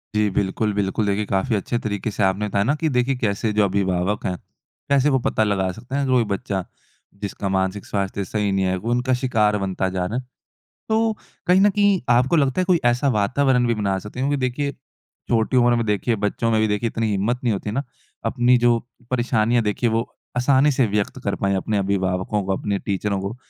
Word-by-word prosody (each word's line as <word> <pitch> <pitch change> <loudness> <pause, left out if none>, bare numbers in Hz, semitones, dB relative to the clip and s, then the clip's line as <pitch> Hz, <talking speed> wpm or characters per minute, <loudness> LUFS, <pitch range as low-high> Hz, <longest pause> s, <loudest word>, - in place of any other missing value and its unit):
जी। 105 -1 +2
बिल्कुल, 100 +2 -1
बिल्कुल। 100 +2 0
देखिए 100 +1 0
काफ़ी 100 +5 0
अच्छे 105 +4 -1
तरीके 105 +1 -2
से 105 - -1
आपने 95 +2 +1
बताया 100 0 +1
ना 140 +8 +1
कि 160 - +3
देखिए 130 +2 +2
कैसे 105 +1 0
जो 105 - +3
अभिभावक 95 0 0
है, 90 - -1 0.5
कैसे 140 +1 +4
वो - - +3
पता 110 - +1
लगा 95 -3 0
सकते 125 +8 -8
हैं 140 -1 0
कोई 130 -2 +3
बच्चा 100 -3 -3 0.6
जिसका 100 -1 -3
मानसिक 95 +1 -1
स्वास्थ्य 100 0 -2
सही 105 +1 -1
नहीं 95 -1 +1
है 95 - +1
वो 115 +6 -3
उनका 125 +2 +1
शिकार 105 -5 +2
बनता 95 -1 -1
जा 90 -1 -2
रहा 110 +7 -3
है। 130 - -3 0.7
तो 225 0 +2 0.3
कहीं 180 +2 +5
न 205 +1 +5
कहीं 200 -2 +3
आपको 125 +7 +4
लगता 140 +1 +2
है 185 - +2
कोई 180 -3 +2
ऐसा 120 +3 +2
वातावरण 125 +3 +2
भी 120 - +2
बना 100 -3 -1
सकते 105 +6 -8
हैं 135 - +1
क्योंकि 145 -1 0
देखिए, 140 +3 -2 0.6
छोटी 115 +2 +1
उम्र 120 -1 +4
में 115 - 0
देखिए 105 +3 0
बच्चों 115 +2 0
में 110 -1 +2
भी 110 - +2
देखिए 105 +3 0
इतनी 115 0 -2
हिम्मत 105 +5 0
नहीं 120 - +2
होती 105 +1 -3
ना, 135 +6 -1 0.4
अपनी 125 0 +3
जो 120 -1 +4 0.3
परेशानियाँ 120 -2 +2
देखिए 110 +3 0
वो 115 +1 0 0.3
आसानी 135 +3 +4
से 130 -2 +2
व्यक्त 105 -1 -2
कर - - 0
पाएँ 100 0 0
अपने 105 +2 -1
अभिभावकों 95 +1 0
को 95 0 0
अपने 100 0 -2
टीचरों 100 0 -2
को। 100 +4 -5
110 Hz, 210 wpm, -22 LUFS, 100-125 Hz, 0.7 s, कहीं